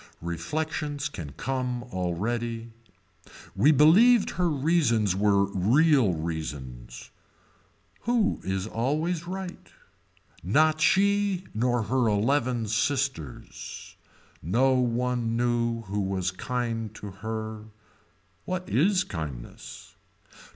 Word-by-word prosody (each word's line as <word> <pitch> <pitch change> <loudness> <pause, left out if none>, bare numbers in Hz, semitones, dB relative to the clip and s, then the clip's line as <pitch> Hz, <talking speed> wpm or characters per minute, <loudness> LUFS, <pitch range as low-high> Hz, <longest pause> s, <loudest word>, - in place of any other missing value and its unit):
Reflections 145 - -3
can 85 - -7
come 125 -2 -3
already. 115 +4 -3 0.8
We 115 +11 +5
believed 200 - +6
her 180 -1 0
reasons 140 - +2
were 100 0 +3
real 115 - +3
reasons. 75 -7 -6 0.9
Who 235 -3 +1
is 95 0 -2
always 155 +10 -1
right. 185 0 -6 0.7
Not 155 - +3
she 200 0 +3
nor 120 +1 +1
her 125 +3 +1
eleven 115 +2 +1
sisters. 115 - -3 0.5
No 120 - +2
one 120 -2 0
knew 120 -1 0
who 105 0 -3
was 95 -1 -1
kind 115 +1 -3
to 105 -2 -8
her. 110 -1 -5 0.8
What 185 0 -3
is 185 +6 +3
kindness. 75 - -8
120 Hz, 95 wpm, -27 LUFS, 100-150 Hz, 0.9 s, believed